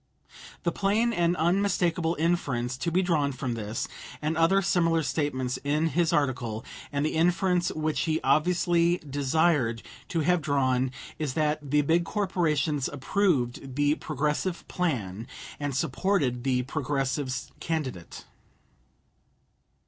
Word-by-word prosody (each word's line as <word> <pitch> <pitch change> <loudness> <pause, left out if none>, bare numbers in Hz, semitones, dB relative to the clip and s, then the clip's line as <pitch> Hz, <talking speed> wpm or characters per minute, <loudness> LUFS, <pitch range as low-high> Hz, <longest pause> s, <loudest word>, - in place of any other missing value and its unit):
The 170 - +1
plain 215 +6 +1
and 175 -2 +2
unmistakable 175 -1 +1
inference 140 -7 0
to 170 +6 -2
be 185 +3 +2
drawn 155 -6 +1
from 130 -2 -3
this 110 0 -3 0.3
and 150 +3 -1
other 180 +5 +3
similar 165 -2 +2
statements 130 -3 -1
in 150 +3 +1
his 165 +2 +1
article, 125 -5 -1 0.3
and 140 0 0
the 155 - -1
inference 175 +2 +2
which 155 0 -1
he 160 -1 +1
obviously 170 +4 +3
desired 140 -4 +1 0.2
to 165 - -1
have 180 +2 +2
drawn, 130 -3 +1 0.3
is 150 -5 -2
that 150 -2 0
the 150 +1 +3
big 165 +4 +3
corporations 165 -7 0
approved 135 -5 0
the 145 +1 +3
Progressive 150 +5 -2
plan 115 - -2 0.3
and 145 -2 -2
supported 145 -5 0
the 125 -2 +2
Progressive 135 -1 -2
candidate. 135 - -4
150 Hz, 125 wpm, -27 LUFS, 130-170 Hz, 0.3 s, other